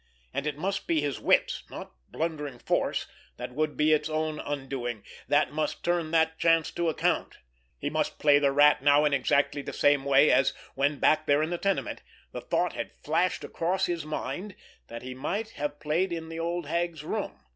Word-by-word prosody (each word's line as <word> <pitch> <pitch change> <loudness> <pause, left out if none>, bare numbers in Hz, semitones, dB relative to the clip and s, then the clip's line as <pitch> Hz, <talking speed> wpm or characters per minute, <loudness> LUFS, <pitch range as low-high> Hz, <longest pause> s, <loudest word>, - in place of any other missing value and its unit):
And 140 - -2
it 150 -1 -2
must 195 +4 -2
be 165 -2 +2
his 145 -1 -2
wits, - - +2
not - - -8 0.2
blundering 150 -5 -3
force, - - 0 0.3
that - - -6
would 155 +2 -1
be 155 +1 +4
its 150 0 +1
own 155 0 -2
undoing, 135 -6 -4 0.2
that 145 +1 +3
must 155 -1 -2
turn 175 -2 0
that 160 0 +2
chance 165 -1 +3
to 170 -1 0
account. 160 - 0 0.4
He 145 - -3
must 155 -1 -1
play 145 -1 +5
the 140 -1 +3
Rat 145 0 +5
now 145 +1 +5
in 150 - +2
exactly 140 +1 +1
the - - -7
same 145 -1 +3
way 140 +2 +5
as, 135 - +3 0.2
when 140 +2 +1
back 155 +3 +3
there 145 +1 +4
in 160 - -2
the 175 - -2
tenement, 195 -2 -1 0.3
the - - -6
thought - - 0
had - - -5
flashed 165 +4 +1
across 180 +3 -1
his 170 -3 -2
mind 155 +6 -5 0.3
that 115 +1 -8
he 130 0 -6
might 200 - -3
have 145 -3 -4
played 170 +5 0
it - - -1
in 160 -1 -7
the 165 0 -6
old 170 0 -2
hag's 170 0 -2
room. 65 - -4
155 Hz, 200 wpm, -28 LUFS, 145-165 Hz, 0.4 s, play